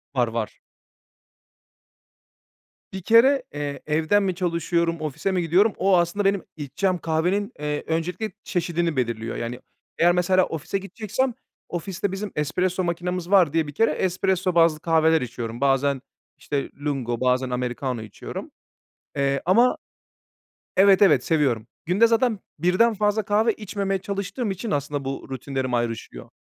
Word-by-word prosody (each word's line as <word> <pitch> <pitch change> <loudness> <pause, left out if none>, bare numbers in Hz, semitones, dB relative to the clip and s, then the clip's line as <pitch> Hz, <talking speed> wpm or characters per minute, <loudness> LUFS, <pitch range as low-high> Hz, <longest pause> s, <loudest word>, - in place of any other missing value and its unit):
Var, 125 -2 +2
var. 115 -1 -4 2.3
Bir 190 0 -6
kere, 250 +7 +5
eee, 145 -1 -4
evden 160 +7 +2
mi 185 -2 -1
çalışıyorum, 170 -2 0
ofise 155 +5 -2
mi 185 - +1
gidiyorum, 185 +6 +3
o 190 -1 +4
aslında 195 +3 +1 0.2
içeceğim 160 +6 -1
kahvenin, 175 +5 0
eee, 150 0 -2
öncelikle 180 +6 -2
çeşidini 170 -3 -1
belirliyor. 115 -3 -2
Yani, 120 +1 -4 0.4
eğer 175 +1 +5
mesela, 180 +1 +3
ofise 165 +5 -3
gideceksem 215 +6 -2 0.4
ofiste 185 +2 -3
bizim 195 +1 -4
espresso 180 +5 0
makinemiz 175 +1 -3
var 180 -7 +5
diye 160 -2 +1
bir 145 - -7
kere 225 +8 +2
espresso 185 0 0
bazlı 165 -2 +4
kahveler 160 -1 +3
içiyorum. 120 -1 -5
Bazen, 140 0 +2 0.4
işte, 140 -2 -3 0.2
lungo, 125 -5 -2
bazen 130 0 +2
americano 125 -1 -2
içiyorum. 105 -2 -8 0.6
Eee, 140 -1 +1
ama 235 +8 +4 1.0
Evet, 195 0 +6
evet, 150 -10 +5
seviyorum. 135 -9 +1 0.2
Günde 195 +7 +4
zaten 230 -1 +2 0.2
1'den 185 +8 +3
fazla 210 +1 +1
kahve 215 +3 +2
içmemeye 200 -2 -3
çalıştığım 200 +4 -3
için 205 +4 -4
aslında 145 -1 -2
bu 135 0 -5
rutinlerim 130 -1 -3
ayrışıyor. 115 -1 -3
170 Hz, 135 wpm, -24 LUFS, 140-195 Hz, 2.3 s, Evet